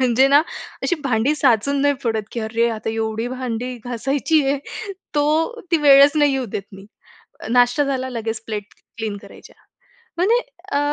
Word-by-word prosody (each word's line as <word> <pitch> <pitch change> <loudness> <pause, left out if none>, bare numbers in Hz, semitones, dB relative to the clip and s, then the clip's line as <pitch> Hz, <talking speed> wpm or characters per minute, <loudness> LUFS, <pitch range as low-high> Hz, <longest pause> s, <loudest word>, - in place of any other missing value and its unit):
म्हणजे 255 +1 +4
ना 285 +2 +6 0.4
अशी 355 - +1
भांडी 250 +3 +1
साचून 275 +1 +2
नाही 285 0 +3
पडत. 225 -2 0
की 235 - -3
"अरे! 230 +2 0
आता 220 0 -4
एवढी 225 +1 -2
भांडी 250 -1 -4
घासायची 275 +6 0
आहे?" 280 +1 +1 0.6
तो 315 +10 +1
ती 335 - +6
वेळच 280 0 +7
नाही 290 -2 +4
येऊ 265 -1 -1
देत 200 - -2
मी. 195 +1 -12 0.6
नाश्ता 245 +3 +3
झाला 260 -1 -2
लगेच 225 -2 -4
प्लेट 210 -2 -4 0.3
क्लीन 215 -2 -3
करायच्या - - -15 0.6
म्हणजे 405 +8 +3 0.3
अ, 285 - +2
255 Hz, 160 wpm, -21 LUFS, 225-285 Hz, 0.6 s, वेळच